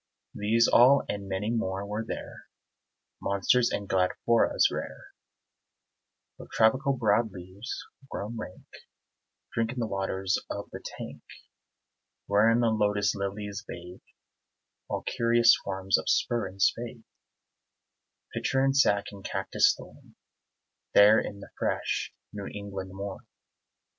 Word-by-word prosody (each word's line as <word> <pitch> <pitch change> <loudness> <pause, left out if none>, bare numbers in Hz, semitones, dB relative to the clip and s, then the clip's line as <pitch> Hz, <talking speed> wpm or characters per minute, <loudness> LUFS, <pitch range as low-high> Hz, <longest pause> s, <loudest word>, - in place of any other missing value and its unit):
These 115 +3 +3
all 130 +3 +6
and 100 -1 -4
many 95 +3 -1
more 100 -4 -2
were 105 +2 -3
there; 115 - -7 0.7
Monsters 110 +5 +2
and 100 - -3
grandifloras 95 +5 +2
rare, - - -7 1.3
With - - -11
tropical 130 +6 +3
broad 110 -1 +2
leaves, 95 +6 -7 0.3
grown 105 +4 -5
rank, 100 -5 -8 0.9
Drinking 115 +2 -1
the 120 - 0
waters 95 -2 -1
of - - -6
the - - -8
tank - - -8 1.0
Wherein 110 +4 +4
the 115 -1 +3
lotus 105 -1 +1
lilies 100 +1 -4
bathe; 90 +1 -9 0.9
All - - -3
curious 115 0 +4
forms 95 -1 +1
of - - -4
spur 120 -3 +1
and 95 +1 -13
spathe, 115 +3 0 1.3
Pitcher 135 0 +1
and 135 0 +2
sac 100 -7 +4
and 100 -1 -11
cactus - - +2
thorn, - - -15 0.8
There 105 +2 +8
in 100 0 -5
the - - -12
fresh - - -1 0.2
New 100 -1 -6
England 100 -2 -6
morn. 100 0 -7
105 Hz, 120 wpm, -28 LUFS, 100-115 Hz, 1.3 s, There